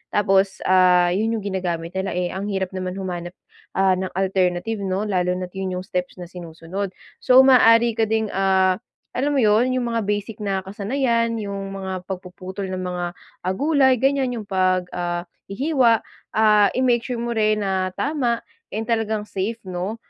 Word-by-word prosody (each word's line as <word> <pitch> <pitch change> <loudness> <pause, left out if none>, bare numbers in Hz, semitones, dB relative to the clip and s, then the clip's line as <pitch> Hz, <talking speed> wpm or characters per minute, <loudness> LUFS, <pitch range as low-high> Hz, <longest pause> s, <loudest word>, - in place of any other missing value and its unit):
Tapos 195 -1 +2
ah, 180 -1 +5
yun 220 +5 0
yung 215 - -4
ginagamit 175 -4 -3
nila 190 0 -3
eh 180 -1 -1
ang 195 +2 -4
hirap 190 -2 -2
naman 185 0 -4
humanap 180 -2 -5 0.4
ah, 190 -1 +4
ng 185 0 -2
alternative 190 +2 0
'no 195 +2 -1
lalo 180 -2 0
na 185 - -3
at 180 - -26
yun 190 -1 -3
yung 185 - -8
steps 180 -2 -3
na 180 - -7
sinusunod. 175 +2 -6 0.3
So 255 0 +5
maaari 235 -3 +6
ka 220 -1 0
ding 220 0 +1
ah, 190 0 +2 0.4
alam 285 +3 +1
mo 280 - +2
yun 220 +3 +4
yung 255 -1 0
mga 230 -1 0
basic 205 +1 -2
na 195 -2 -1
kasanayan 230 +3 0
yung 195 -1 -5
mga 190 -1 -5
pagpuputol 185 +1 -6
ng 185 - -3
mga 180 -1 -3 0.4
ah, 185 - +1
gulay 265 0 +3
ganyan 270 -2 +2
yung 225 -3 -5
pag 185 -1 +1
ah, 175 0 -3 0.2
hihiwa 245 0 +2 0.3
ah, 210 -2 +5
i-make 250 -2 +3
sure 250 -2 -3
mo 235 0 -2
rin 215 -1 +2
na 190 -1 -1
tama 255 -4 0 0.3
and 220 - -2
talagang 220 -2 0
safe 200 +4 -2
no? 185 +3 -4
195 Hz, 175 wpm, -22 LUFS, 185-225 Hz, 0.4 s, maaari